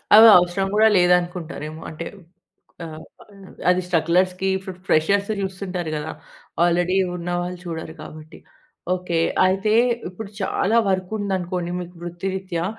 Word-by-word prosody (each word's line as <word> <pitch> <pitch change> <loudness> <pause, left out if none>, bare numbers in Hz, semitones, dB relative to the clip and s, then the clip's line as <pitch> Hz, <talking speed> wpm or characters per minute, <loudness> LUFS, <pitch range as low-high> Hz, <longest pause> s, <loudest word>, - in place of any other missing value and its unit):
అవి 220 +2 +10
అవసరం 180 +2 +1
కూడా 220 +1 +6
లేదనుకుంటారేమో. 175 -3 0
అంటే, 165 +1 -7 0.8
ఆహ్, 160 -1 -9 0.7
అది 180 0 +3
స్ట్రగ్‌లర్స్‌కి 180 +2 +1
ఇప్పుడు 190 -1 -9
ఫ్రెషర్స్‌ని 200 +6 +2
చూస్తుంటారు 185 -3 -4
కదా! 150 +1 -4 0.5
ఆల్రెడీ 175 +2 +2 0.2
ఉన్నవాళ్ళు 175 +1 -3
చూడరు 160 -1 -6
కాబట్టి. 155 +1 -12 0.6
ఓకె. 180 -2 -2 0.3
అయితే 195 +3 +1 0.4
ఇప్పుడు 195 +3 -8
చాలా 195 +3 +1
వర్క్ 185 0 -1
ఉందనుకోండి 180 -3 -2
మీకు 180 0 -10
వృత్తిరీత్యా, 175 0 -3
180 Hz, 115 wpm, -22 LUFS, 170-190 Hz, 0.8 s, అవి